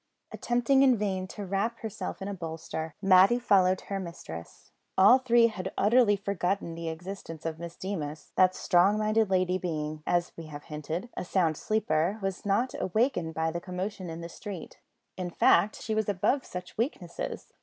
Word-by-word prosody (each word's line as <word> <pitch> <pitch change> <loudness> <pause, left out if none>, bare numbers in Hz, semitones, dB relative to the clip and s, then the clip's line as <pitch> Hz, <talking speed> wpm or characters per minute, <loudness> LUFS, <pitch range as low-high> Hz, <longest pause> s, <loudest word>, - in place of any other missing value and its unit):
Attempting 245 +3 +2
in 260 -3 +5
vain 190 -3 -2
to 205 +2 -7
wrap 200 +5 -1
herself 220 -3 -5
in - - -4
a 200 - -3
bolster, 160 -2 -5
Matty 190 +4 +6
followed 190 -6 +3
her 195 -1 -4
mistress. 165 - -9 0.3
All 205 +7 +7
three 240 -2 +5
had 190 -4 -2
utterly 215 0 +4
forgotten 195 -2 -2
the 165 0 -4
existence 165 -1 -7
of 160 0 -3
Miss 170 0 -7
Deemas. 155 -6 -5
That 185 0 +4
strong 185 +4 +3
minded 215 0 +2
lady 185 -1 +2
being, 155 -3 -3
as 175 0 +1
we 165 -1 -8
have 145 -1 -9
hinted, 160 +7 -5
a - - -3
sound 175 -3 +1
sleeper, 190 -1 0
was 195 0 -4
not 235 +6 +1
awakened 185 - 0
by 160 0 0
the 170 +1 -4
commotion 185 +1 -5
in 165 +1 -6
the 170 - -5
street. 190 0 -8 0.4
In 180 -1 -3
fact, 200 +4 +3
she 220 - -3
was 215 -1 0
above 205 +8 +1
such 180 +3 -8
weaknesses. 190 - -4
185 Hz, 175 wpm, -29 LUFS, 170-210 Hz, 0.4 s, All